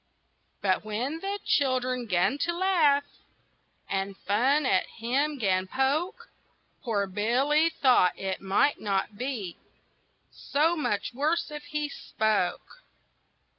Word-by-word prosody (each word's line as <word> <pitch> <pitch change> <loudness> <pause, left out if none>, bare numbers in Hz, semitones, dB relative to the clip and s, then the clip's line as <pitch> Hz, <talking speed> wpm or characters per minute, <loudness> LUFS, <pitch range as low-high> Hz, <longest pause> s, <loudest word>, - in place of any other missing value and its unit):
But 190 -1 +1
when 240 +9 -3
the 395 +3 -3
children 255 -3 +1
'gan 195 +8 +1
to 345 +3 0
laugh, 330 -7 +3 0.8
And 195 0 -3
fun 260 +9 +2
at 190 -7 +2
him 275 +6 0
'gan 190 -5 +1
poke, 305 - -1 0.5
Poor 210 -5 0
Billy 250 - +2
thought 255 - +3
it 190 -1 -3
might 195 +9 +2
not 200 0 -1
be 225 -7 -4 0.7
So 315 +4 +1
much 210 -9 -2
worse 305 +5 0
if 295 0 -7
he 300 0 -2
spoke. 220 - -2
255 Hz, 115 wpm, -27 LUFS, 200-295 Hz, 0.8 s, laugh